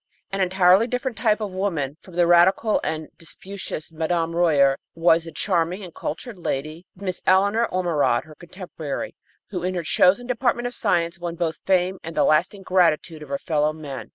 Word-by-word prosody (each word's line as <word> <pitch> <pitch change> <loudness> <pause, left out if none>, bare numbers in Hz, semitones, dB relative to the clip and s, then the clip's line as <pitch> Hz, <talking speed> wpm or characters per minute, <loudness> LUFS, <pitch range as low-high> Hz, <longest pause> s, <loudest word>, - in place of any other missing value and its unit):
An 195 0 -1
entirely 185 +3 +4
different 250 0 -3
type 215 0 +1
of 205 -2 -3
woman 170 -8 -2
from 185 - -14
the 175 0 +4
radical 180 +5 +4
and 155 -1 -3
disputatious 185 -1 -7
Mme. 165 +1 -1
Royer 145 -6 +3 0.2
was 165 0 +3
the 165 - -8
charming 180 +1 -1
and 175 -3 -10
cultured 200 - -6
lady, 155 +3 -4
Miss 185 -1 -4
Eleanor 200 +5 +3
Ormerod, 165 -9 +1
her 155 - -14
contemporary, 170 -3 -7 0.4
who, 180 -3 -3
in 185 +1 -2
her 175 - -2
chosen 185 +8 +3
department 240 -1 0
of 245 - -3
science, 170 -4 0
won 170 -1 -4
both 165 -2 -2
fame 185 0 +2
and 165 +1 -8
the - - +4
lasting 185 +6 +2
gratitude 170 -3 +1
of 150 - -10
her 140 - -1
fellowmen. 150 -3 -2
175 Hz, 175 wpm, -23 LUFS, 160-195 Hz, 0.4 s, entirely